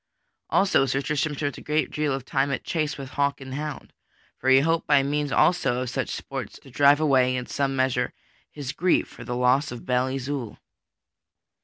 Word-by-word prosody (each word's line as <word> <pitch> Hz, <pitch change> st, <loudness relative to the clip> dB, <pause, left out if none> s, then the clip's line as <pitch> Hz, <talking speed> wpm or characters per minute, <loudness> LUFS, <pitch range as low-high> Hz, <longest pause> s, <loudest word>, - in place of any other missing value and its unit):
Also 190 Hz, -8 st, +3 dB
Sir 130 Hz, +2 st, 0 dB
Tristram 150 Hz, +1 st, -1 dB
spent 145 Hz, 0 st, -3 dB
a -, -, -12 dB
great 150 Hz, +1 st, -1 dB
deal 150 Hz, -1 st, -1 dB
of 135 Hz, -1 st, -3 dB
time 135 Hz, +1 st, 0 dB
at 140 Hz, -, -2 dB
chase 155 Hz, -4 st, -2 dB
with 135 Hz, -2 st, -7 dB
hawk 140 Hz, 0 st, 0 dB
and 130 Hz, -1 st, -8 dB
hound; 150 Hz, +1 st, -6 dB, 0.5 s
for 130 Hz, -, 0 dB
he 130 Hz, 0 st, +7 dB
hoped 165 Hz, +2 st, 0 dB
by 145 Hz, -2 st, +5 dB
means 145 Hz, 0 st, -1 dB
also 135 Hz, -8 st, +2 dB
of 125 Hz, -, -5 dB
such -, -, -2 dB
sports -, -, -6 dB
to 135 Hz, -, -15 dB
drive 140 Hz, +3 st, +5 dB
away, 130 Hz, -4 st, +3 dB
in 125 Hz, 0 st, -3 dB
some 135 Hz, 0 st, -1 dB
measure, 130 Hz, -1 st, +1 dB, 0.4 s
his 145 Hz, -3 st, -6 dB
grief 180 Hz, +3 st, +1 dB
for -, -, -12 dB
the 120 Hz, +1 st, -4 dB
loss 125 Hz, +3 st, +2 dB
of 120 Hz, -, -8 dB
Belle 125 Hz, 0 st, +1 dB
Isoult. 130 Hz, -3 st, -4 dB
135 Hz, 195 wpm, -25 LUFS, 130-150 Hz, 0.5 s, he